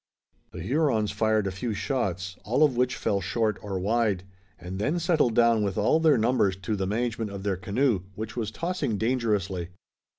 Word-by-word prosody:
The - - -8
Hurons 130 -7 +1
fired 110 -2 +1
a 95 - -1
few 110 +3 -3
shots, 95 -4 -2
all 125 +8 +2
of 145 -5 +3
which 125 +1 +1
fell 100 -1 0
short 105 +3 0
or 100 -2 -4
wide, 105 -1 +1 0.3
and 90 +3 -7
then 145 +11 0
settled 165 -9 +2
down 115 -2 +4
with 100 -2 -1
all 160 - +3
their 160 -4 +4
numbers 110 -4 +2
to 105 +2 -1
the 95 -2 -2
management 115 +1 -1
of 100 -1 -7
their 100 -2 0
canoe, 105 +3 +1
which 110 +1 -6
was 115 -4 -2
tossing 165 - -2
dangerously. 105 -7 0
110 Hz, 185 wpm, -27 LUFS, 100-125 Hz, 0.3 s, down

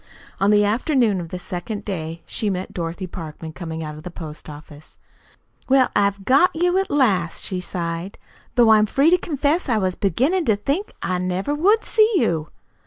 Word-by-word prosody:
On 195 - +3
the 210 0 +5
afternoon 225 - +1
of 165 - -8
the 180 - -5
second 185 +4 -6
day 165 -4 -5
she 215 - -2
met 185 -1 -4
Dorothy 170 +2 -4
Parkman 160 -3 -8
coming 160 -2 -6
out 155 -1 -6
of 150 - -10
the 180 - -7
post 155 -3 -9
office. 150 0 -12 0.7
"Well, 265 -1 +4
I've 200 -1 +1
got 315 - +4
you 355 +3 +2
at 385 - -2
last," 195 - +1
she 185 - -3
sighed, 170 +1 -4 0.4
"though 235 -3 +6
I'm 215 -1 +5
free 280 +9 +3
to 360 - +6
confess 300 +1 0
I 230 - +2
was 185 -3 0
beginnin' 265 - +1
to 220 - +3
think 280 - -2
I 180 -1 -1
never 185 +8 -1
would 395 +9 +3
see 440 0 +3
you." 165 - +1
200 Hz, 185 wpm, -22 LUFS, 170-275 Hz, 0.7 s, though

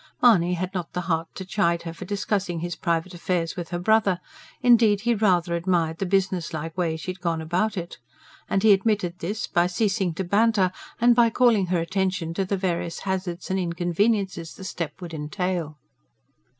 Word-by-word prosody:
Mahony 180 -7 +5
had 185 +2 -4
not 180 -3 -4
the 180 - -2
heart 165 -2 -1
to 190 - -6
chide 170 -3 +1
her 165 -1 -5
for - - -8
discussing 200 -2 -1
his 175 0 -3
private 170 +1 -1
affairs 175 -1 -2
with 175 -3 -5
her 175 - -2
brother. 200 0 +2 0.4
Indeed, 225 -4 +5
he 235 +2 +2
rather 185 -5 +2
admired 170 -2 0
the 195 - -1
businesslike 175 -4 -1
way 170 -3 0
she 175 +3 -4
had 185 - -11
gone 170 -2 0
about 185 +7 -1
it. 170 -1 -6 0.5
And 195 - +1
he 220 - +7
admitted 195 -3 0
this, 205 +6 -3
by 175 0 +2
ceasing 190 -2 0
to 190 - -2
banter 200 0 +3 0.3
and 240 +1 +5
by 235 -1 +5
calling 225 -5 +3
her 180 -1 +1
attention 185 -1 -1
to 195 +3 -1
the 195 +1 -1
various 175 -2 -2
hazards 185 -2 -3
and 190 - +1
inconveniences 175 +1 0
the 190 - -10
step 170 -3 -5
would 170 -2 -7
entail. 160 0 -3
180 Hz, 185 wpm, -25 LUFS, 170-200 Hz, 0.5 s, he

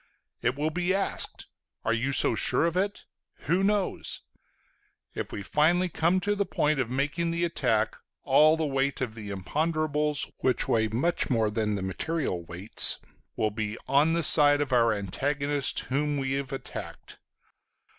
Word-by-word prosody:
It 125 +2 0
will 150 +2 -1
be 180 +3 0
asked: 195 - -1 0.4
"Are 115 - +2
you 120 +4 -1
so - - +4
sure - - +3
of 170 0 -1
it? 200 +2 -2 0.4
Who 180 +3 0
knows?" 205 -1 0 0.9
If - - -5
we 100 - -6
finally 175 - +2
come 170 +3 +1
to 205 +2 0
the 205 -1 0
point 150 -6 0
of 125 -3 -1
making 145 +6 -1
the 170 +1 0
attack, 125 -10 0 0.3
all 155 +3 +5
the 160 - -1
weight 135 -1 -1
of 125 -4 -3
the 110 -2 -8
imponderables, 150 - -1
which 130 - +1
weigh 110 -1 +2
much 130 +11 0
more 110 -4 +1
than 105 -1 -1
the 95 - -4
material 95 - -3
weights, 90 +5 +3 0.4
will 110 - 0
be 110 +1 -4
on 145 +4 +3
the 170 0 0
side 145 -1 +6
of 145 -3 -2
our 115 -2 +4
antagonist 140 +8 -1
whom 145 +2 -1
we 135 -1 -2
have 135 +1 -3
attacked. 135 - -8
140 Hz, 165 wpm, -27 LUFS, 115-160 Hz, 0.9 s, side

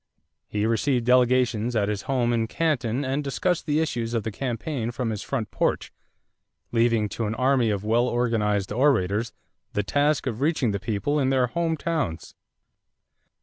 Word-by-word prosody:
He 105 0 -1
received 120 +2 +1
delegations 125 -2 +3
at 105 -2 +2
his 105 -2 -2
home 120 -3 +1
in 115 -1 0
Canton 135 -4 0
and 135 +3 -1
discussed 165 +6 -1
the 150 0 +2
issues 120 -7 -1
of 115 - 0
the 110 - -3
campaign 120 +1 -3
from 120 -1 -2
his 105 -1 -4
front 115 -7 -3
porch, - - -1 0.8
leaving 115 -2 +2
to 110 +2 -3
an 110 - -2
army 130 -1 +2
of 100 -1 -2
well 120 +3 +2
organized 110 -5 0
orators 115 -4 +2 0.4
the 105 - 0
task 145 +8 +1
of 120 -2 -3
reaching 145 -6 +1
the 100 - -2
people 110 +9 -1
in 130 -2 +2
their 130 -2 +3
home 165 +4 -1
towns. 150 - -3
120 Hz, 165 wpm, -25 LUFS, 110-135 Hz, 0.8 s, delegations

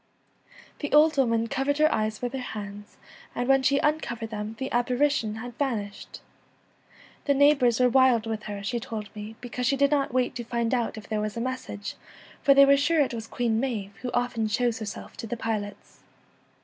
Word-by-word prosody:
The 290 - -4
old 310 +1 +6
woman 230 -4 +2
covered 270 +5 -1
her 310 +1 +4
eyes 215 +1 -2
with 245 +1 -2
her 265 - -3
hands, 205 -4 -7 0.4
and 245 0 -1
when 270 0 +5
she 275 +1 +3
uncovered 235 -7 -1
them 210 +1 -5
the 265 0 -4
apparition 245 -2 +1
had 240 +1 -8
vanished. 215 -8 -3 1.0
The 280 - +3
neighbours 275 -5 +4
were 250 - +5
l 250 - +3
wild 255 -3 +4
with 220 -1 -3
her,' 205 -1 -6
she 240 +4 -1
told 220 -2 -7
me, 210 +1 -7
because 245 0 -3
she 275 - +2
did 280 +1 +3
not 280 -2 +1
wait 255 0 +1
to 240 - -4
find 235 0 -1
out 240 -3 -1
if 215 - -9
there 215 -1 -1
was 215 +1 -3
a - - -1
mes 255 +2 -2
sage, 205 -1 -7 0.5
for 275 - +5
they 275 0 +8
were 280 0 +5
sure 320 +3 +2
it 270 - 0
was 225 -1 -5
Queen 230 -2 0
Maive, 215 -6 -3
who 250 - -3
often 245 -2 0
shows 230 +2 0
herself 210 -2 -7
to 230 - -6
the 240 - -4
pilots. 210 -3 -5
240 Hz, 205 wpm, -26 LUFS, 220-270 Hz, 1.0 s, they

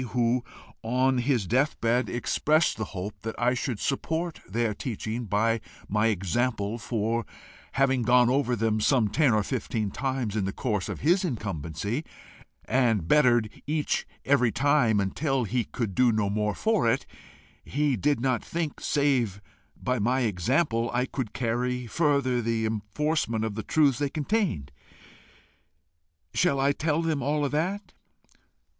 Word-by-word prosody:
who, 120 +1 +2 0.4
on 130 +3 +1
his 120 -4 +1
death 135 - +1
bed, 120 +1 +1
expressed 155 +6 +1
the 110 - -3
hope 95 +2 -7
that 115 0 -5
I 125 +1 +3
should 125 -3 -3
support 160 +6 -2
their 115 +2 0
teaching 115 +1 -4
by 110 +2 +1 0.3
my 105 +2 +2
example, 110 +2 -1
for, 115 0 -1 0.5
having 135 -2 +2
gone 125 +1 +5
over 125 -1 +2
them 110 -1 0
some 115 -2 +3
ten 145 +4 +3
or 110 -1 +2
fifteen 110 -4 -2
times 130 -5 -2
in 105 -3 0
the 95 - -1
course 105 -5 -2
of - - -5
his 175 +6 +3
incumbency, 100 - -3 0.6
and 115 -8 +2
bettered 120 - +4 0.2
each 150 0 -1 0.2
every 125 -4 +3
time 140 -5 +3
until 135 +7 0
he 115 +2 -1
could 110 -3 -3
do 125 +3 +4
no 105 -2 0
more 105 0 0
for 215 - +2
it, - - -1 0.6
he 145 -1 0
did 145 +5 +1
not 125 -2 0
think, 165 -3 -3
save 130 -9 +1 0.4
by 125 -1 -1
my 125 +5 +1
example, 115 - +1
I 125 +1 +2
could 130 -5 -4
carry 125 +1 -1
further 140 -2 +1
the 115 -1 0
enforcement 110 +2 -1
of 110 - -3
the 110 - -4
truths 145 0 +2
they 145 -1 0
contained: 150 - -1 1.6
shall 140 -6 +2
I 140 +1 +3
tell 155 +2 0
them 160 -4 0
all 145 +2 0
that?" 175 +8 -2
120 Hz, 150 wpm, -27 LUFS, 110-140 Hz, 1.6 s, gone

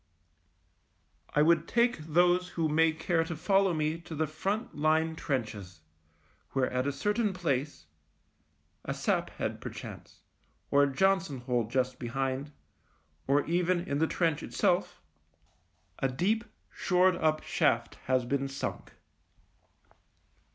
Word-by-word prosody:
I 150 - +5
would 165 0 +3
take 235 -4 +2
those 175 +3 +2
who 165 -1 +2
may 160 +1 +3
care 165 +1 0
to 165 0 -5
follow 195 +4 +2
me 155 0 -1
to 165 -1 -8
the 160 +1 +1
front 195 +9 -3
line 160 +2 +1
trenches, 105 - -4 0.7
where 130 -1 +1
at 125 +2 0
a - - +1
certain 205 - 0
place 145 - -2 0.5
— - - -42
a - - -3
sap - - 0
head, - - -4
perchance, - - -9 0.5
or 140 - +5
a 145 -1 +3
Johnson 185 -3 +1
hole 125 -2 0
just 130 +2 -1
behind, 135 +3 -2 0.8
or 140 +1 +3
even 175 +1 +1
in 145 -6 -2
the 160 - +3
trench 165 -4 0
itself - - 0 0.5
— - - -30
a 135 - +2
deep, 210 - 0 0.3
shored 185 0 +3
up 155 -1 +1
shaft - - +1 0.2
has 130 -1 +2
been 135 +2 -1
sunk. 135 0 -5
155 Hz, 135 wpm, -30 LUFS, 135-175 Hz, 0.8 s, I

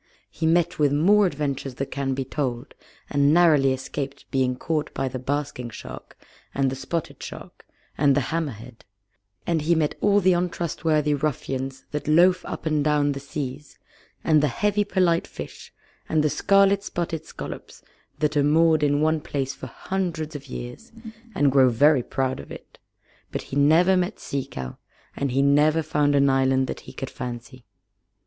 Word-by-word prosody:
He 160 - -2
met 170 +1 +2
with 145 -2 +3
more 195 +8 +4
adventures 140 -4 -3
than 135 +1 -3
can 135 -1 -2
be 135 0 -3
told, 130 -2 -3 0.3
and 140 0 +3
narrowly 155 -5 +5
escaped 135 +1 -5
being 130 -1 +1
caught 155 +3 -2
by 135 - -1
the 130 0 -5
Basking 135 -2 -3
Shark, 110 - -10 0.4
and 135 -1 +1
the - - -3
Spotted 165 +4 -4
Shark, - - -10 0.3
and 140 -1 +4
the 145 - +2
Hammerhead, 125 -7 -5 0.6
and 165 -2 0
he 165 +3 +2
met 155 -2 +1
all 205 0 +4
the 185 -1 +4
untrustworthy 165 -4 0
ruffians 135 -2 -3
that 150 0 -4
loaf 180 +4 +4
up - - -6
and 155 -2 +1
down 150 -1 +2
the 140 - -4
seas, 140 0 -6 0.5
and 155 -2 +4
the 150 - +3
heavy 205 - +1
polite 185 -4 +1
fish, - - -9 0.4
and 155 -1 +2
the 150 - +1
scarlet 200 0 +3
spotted 165 -5 -4
scallops - - -9 0.3
that 150 0 0
are 145 - +4
moored 155 +2 +4
in 145 0 +2
one 155 0 +2
place 135 -2 -3
for - - -9
hundreds 170 -5 -4
of 140 - -8
years, 125 - -8 0.4
and 145 -1 +3
grow 130 -1 +5
very 140 +4 +4
proud 130 +1 -2
of - - -10
it; - - -12 0.5
but - - -4
he - - -1
never 160 +6 +5
met 180 -1 -1
Sea 140 -1 -4
Cow, 65 - -7 0.4
and 140 - -1
he 135 +2 +1
never 150 +3 +3
found 145 -2 +1
an 140 0 +4
island 135 0 +2
that - - -5
he - - -9
could 135 - -6
fancy. 125 0 -7
145 Hz, 170 wpm, -24 LUFS, 135-160 Hz, 0.6 s, narrowly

